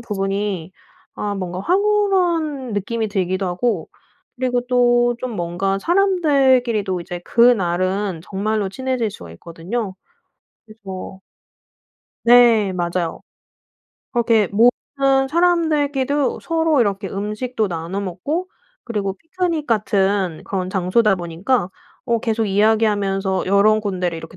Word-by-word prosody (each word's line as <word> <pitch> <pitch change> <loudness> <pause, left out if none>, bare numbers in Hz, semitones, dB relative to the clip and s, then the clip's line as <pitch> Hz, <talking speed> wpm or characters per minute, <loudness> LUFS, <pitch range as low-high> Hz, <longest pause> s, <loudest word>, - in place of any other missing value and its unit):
부분이 195 -4 -3 0.4
아 205 -1 -3
뭔가 185 -2 -4
황홀한 355 - +1
느낌이 220 +2 -2
들기도 190 -1 -1
하고 180 +1 -1 0.5
그리고 250 -1 0
또 240 -1 +3
좀 255 -1 -4
뭔가 180 +3 -1
사람들끼리도 265 - +2
이제 175 0 -6
그날은 190 -5 +2
정말로 205 +2 -2
친해질 255 0 -2
수가 85 - -11
있거든요. 185 - -5 0.7
그래서 195 -4 -9 1.1
네. 235 -4 +5
맞아요. 175 -1 -2 0.9
그렇게 230 -4 +2
모든 270 +5 +2
사람들끼도 295 -4 +1
서로 325 -3 +1
이렇게 200 -3 0
음식도 215 +3 -3
나눠 170 +3 -4
먹고 285 - -3 0.3
그리고 200 -4 -3
피크닉 330 - -3
같은 195 -6 0
그런 185 -2 -3
장소다 195 +3 +2
보니까 180 +5 -1 0.4
어 235 -2 +1
계속 225 -1 -1
이야기하면서 205 -2 +1
여러 200 +3 +4
군데를 185 -5 -2
이렇게 165 +2 -11
215 Hz, 270 characters per minute, -20 LUFS, 190-255 Hz, 1.1 s, 네